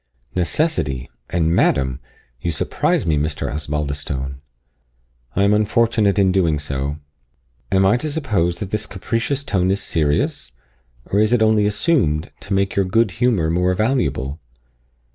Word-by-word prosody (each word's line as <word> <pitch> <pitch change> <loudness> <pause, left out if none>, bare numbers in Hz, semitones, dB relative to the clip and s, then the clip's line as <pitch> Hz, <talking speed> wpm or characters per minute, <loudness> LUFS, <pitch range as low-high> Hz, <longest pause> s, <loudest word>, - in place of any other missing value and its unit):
"Necessity! 90 - -1 0.2
and 85 -1 +1
madam! 65 -1 +2 0.4
You 85 - -1
surprise 75 - 0
me, 80 -2 +2
Mr. 75 -1 -2
Osbaldistone." 70 -2 -3 0.9
"I 100 - +3
am 100 +1 +4
unfortunate 110 -1 +2
in 95 -2 +4
doing 85 -5 +2
so." 70 0 -3 0.7
"Am 95 0 +4
I 100 +5 +4
to 155 +4 -3
suppose 105 - 0
that 100 -1 -4
this 105 0 -1
capricious 115 +8 -2
tone 95 -9 0
is 100 +1 +1
serious? 75 -5 0 0.5
or 100 - 0
is 110 +2 +3
it 115 -2 +4
only 110 -1 +3
assumed, 105 - +1
to 100 - -5
make 95 0 0
your 100 - +2
good 115 +2 +2
humour 100 -11 +2
more 90 +2 +1
valuable?" 100 - 0
95 Hz, 145 wpm, -20 LUFS, 75-110 Hz, 0.9 s, am